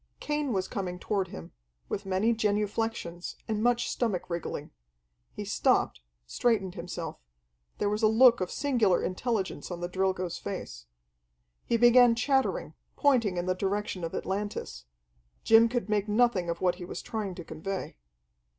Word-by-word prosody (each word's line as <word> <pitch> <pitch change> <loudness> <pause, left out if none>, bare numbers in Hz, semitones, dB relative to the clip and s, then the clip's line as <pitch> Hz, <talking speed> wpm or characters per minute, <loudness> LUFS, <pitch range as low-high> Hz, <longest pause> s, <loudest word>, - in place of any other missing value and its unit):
Cain 295 -2 -1
was 190 -4 0
coming 180 -3 -4
toward 195 0 -1
him, 80 - -9 0.4
with 195 - -4
many 195 +5 +2
genuflexions, 210 -4 -2
and 215 -1 -1
much 240 +1 +2
stomach 200 -7 -2
wriggling. 170 -1 -4 0.6
He - - -6
stopped, 65 - +1 0.2
straightened 195 - 0
himself. 170 -2 -6 0.6
There 205 - 0
was 210 +2 0
a 220 - +5
look 235 0 +6
of 180 - -1
singular 240 -10 +2
intelligence 200 +1 -2
on 175 -2 -5
the 175 - -2
Drilgo's 185 -1 -1
face. - - -6 0.8
He 235 - +2
began 240 0 +7
chattering, 265 +2 0 0.2
pointing 235 -10 +2
in 175 - -1
the 185 - +1
direction 195 -1 -2
of 165 - -3
Atlantis. 195 - -4 0.6
Jim 225 +1 +6
could 245 -1 -2
make 210 -1 0
nothing 210 -5 +2
of 170 0 -3
what 180 -1 +2
he - - -4
was 175 - -6
trying 210 -5 -4
to 175 - -7
convey. 185 +5 -5
205 Hz, 150 wpm, -29 LUFS, 180-230 Hz, 0.8 s, began